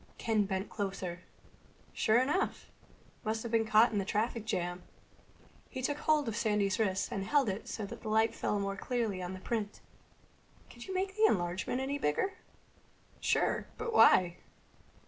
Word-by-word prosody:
Ken 220 Hz, -3 st, +1 dB
bent 190 Hz, 0 st, -2 dB
closer. 190 Hz, -4 st, -4 dB, 0.7 s
"Sure 220 Hz, +2 st, +3 dB
enough! 295 Hz, +10 st, -1 dB, 0.5 s
Must 220 Hz, +1 st, -2 dB
have 235 Hz, -, -5 dB
been 225 Hz, -1 st, +2 dB
caught 220 Hz, +2 st, +5 dB
in 210 Hz, -, 0 dB
the -, -, 0 dB
traffic 215 Hz, +3 st, -1 dB
jam." 175 Hz, -4 st, -2 dB, 0.9 s
He 260 Hz, -1 st, -6 dB
took 290 Hz, +3 st, -1 dB
hold 305 Hz, -3 st, +2 dB
of 225 Hz, -, -2 dB
Sandy's 210 Hz, -4 st, +1 dB
wrist 190 Hz, -4 st, 0 dB
and 195 Hz, -, -2 dB
held 280 Hz, +5 st, +2 dB
it 195 Hz, +2 st, -4 dB
so 215 Hz, -, -4 dB
that -, -, -9 dB
light 220 Hz, +1 st, +2 dB
fell 210 Hz, -, -1 dB
more 195 Hz, 0 st, -2 dB
clearly 220 Hz, -3 st, -2 dB
on 180 Hz, +1 st, -4 dB
the -, -, -8 dB
print. 210 Hz, 0 st, -3 dB, 0.9 s
"Could 240 Hz, -, -11 dB
you 380 Hz, -, -4 dB
make 385 Hz, +1 st, -1 dB
the 435 Hz, +1 st, +4 dB
enlargement 185 Hz, -, -1 dB
any 280 Hz, +2 st, -2 dB
bigger?" 215 Hz, -, 0 dB, 0.9 s
"Sure. -, -, +1 dB
But 460 Hz, 0 st, -3 dB
why?" 180 Hz, -, +6 dB
220 Hz, 165 wpm, -32 LUFS, 195-245 Hz, 0.9 s, why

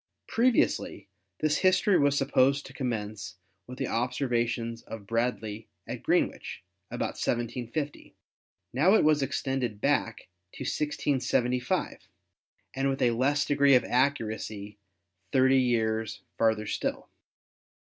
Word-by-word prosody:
Previously 240 Hz, +1 st, +1 dB, 0.3 s
this 155 Hz, -1 st, +2 dB
history 190 Hz, +1 st, +3 dB
was 145 Hz, 0 st, +3 dB
supposed 135 Hz, 0 st, +2 dB
to -, -, -11 dB
commence 110 Hz, -7 st, -4 dB, 0.3 s
with 125 Hz, +1 st, -9 dB
the -, -, -2 dB
observations 120 Hz, -1 st, -1 dB
of 110 Hz, -3 st, -9 dB
Bradley 110 Hz, -1 st, -2 dB, 0.2 s
at -, -, -6 dB
Greenwich, -, -, -1 dB, 0.3 s
about -, -, -4 dB
1750; 120 Hz, +5 st, -3 dB, 0.6 s
now 165 Hz, -, +4 dB
it -, -, +4 dB
was 150 Hz, -1 st, +4 dB
extended 135 Hz, -5 st, -2 dB
back 125 Hz, -4 st, 0 dB, 0.3 s
to -, -, -7 dB
1675, 125 Hz, -3 st, -1 dB, 0.7 s
and 135 Hz, +1 st, 0 dB
with 135 Hz, -, -1 dB
a 120 Hz, -, +4 dB
less 140 Hz, +5 st, +1 dB
degree 140 Hz, -1 st, +4 dB
of 125 Hz, -, +4 dB
accuracy 110 Hz, -5 st, -1 dB, 0.5 s
thirty 130 Hz, 0 st, +4 dB
years 110 Hz, -3 st, 0 dB
far 110 Hz, -1 st, +3 dB
ther 110 Hz, 0 st, -6 dB
still. -, -, -3 dB
125 Hz, 120 wpm, -28 LUFS, 115-140 Hz, 0.7 s, now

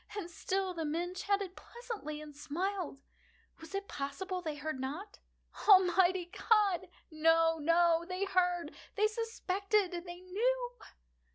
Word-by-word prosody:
And 350 Hz, -4 st, -5 dB
still 375 Hz, +2 st, -1 dB
the 330 Hz, -2 st, -3 dB
men 335 Hz, +4 st, -2 dB
chatted 395 Hz, 0 st, -1 dB
pleasantly, 450 Hz, -11 st, -7 dB
and 300 Hz, -1 st, -10 dB
smiled. 330 Hz, 0 st, -3 dB, 0.6 s
Was 325 Hz, +4 st, -8 dB
it 395 Hz, 0 st, -3 dB
possible 360 Hz, +7 st, -4 dB
they 310 Hz, -4 st, -3 dB
heard 295 Hz, -2 st, -4 dB
not? 305 Hz, +11 st, -5 dB, 0.5 s
Almighty 370 Hz, -2 st, +6 dB
God!—no, 340 Hz, -5 st, +2 dB
no! 335 Hz, +1 st, +3 dB
They 370 Hz, +2 st, -1 dB
heard!—they 365 Hz, +2 st, 0 dB
suspected!—they 390 Hz, -5 st, -1 dB
knew! 485 Hz, +7 st, 0 dB
360 Hz, 110 wpm, -33 LUFS, 325-395 Hz, 0.6 s, Almighty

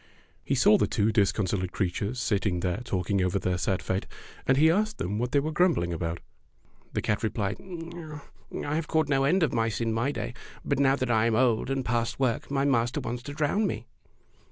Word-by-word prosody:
He -, -, 0 dB
saw -, -, +5 dB
the -, -, +2 dB
two 105 Hz, +2 st, +1 dB
discon 100 Hz, -1 st, +2 dB
solate 90 Hz, -1 st, -2 dB
creatures 100 Hz, +5 st, -2 dB
sitting 100 Hz, -6 st, 0 dB
there 90 Hz, +5 st, -1 dB
talking 95 Hz, -3 st, -1 dB
over 90 Hz, +1 st, +1 dB
their 90 Hz, -2 st, -1 dB
sad 95 Hz, -1 st, -1 dB
fate, 95 Hz, +1 st, -2 dB, 0.4 s
and 130 Hz, -, +4 dB
he 160 Hz, +3 st, +6 dB
asked 215 Hz, +4 st, 0 dB
them 100 Hz, +3 st, -2 dB
what 125 Hz, +1 st, -1 dB
they 145 Hz, -, +4 dB
were 155 Hz, +3 st, -2 dB
grumbling 155 Hz, -, +2 dB
about. 85 Hz, 0 st, -3 dB, 0.7 s
The -, -, -1 dB
cat 105 Hz, -, 0 dB
replied, 105 Hz, -2 st, -1 dB
'T 170 Hz, -3 st, -8 dB, 0.5 s
have 150 Hz, +2 st, -2 dB
caught 160 Hz, -2 st, +1 dB
no 135 Hz, -1 st, +3 dB
end 180 Hz, +5 st, +3 dB
of 150 Hz, -, +1 dB
mice 115 Hz, -2 st, 0 dB
in 115 Hz, -1 st, 0 dB
my 120 Hz, +5 st, 0 dB
day, -, -, -4 dB, 0.3 s
but -, -, 0 dB
now 135 Hz, -1 st, +4 dB
that 130 Hz, -3 st, -1 dB
I 110 Hz, 0 st, +3 dB
am 115 Hz, -, +1 dB
old 120 Hz, -1 st, +2 dB
and 135 Hz, -1 st, -1 dB
past 120 Hz, 0 st, -1 dB
work 125 Hz, -4 st, 0 dB
my 140 Hz, 0 st, +1 dB
master 120 Hz, -3 st, +1 dB
wants 120 Hz, +1 st, -4 dB
to 145 Hz, +3 st, -7 dB
drown 155 Hz, +9 st, +1 dB
me." -, -, -4 dB
120 Hz, 210 wpm, -27 LUFS, 100-145 Hz, 0.7 s, he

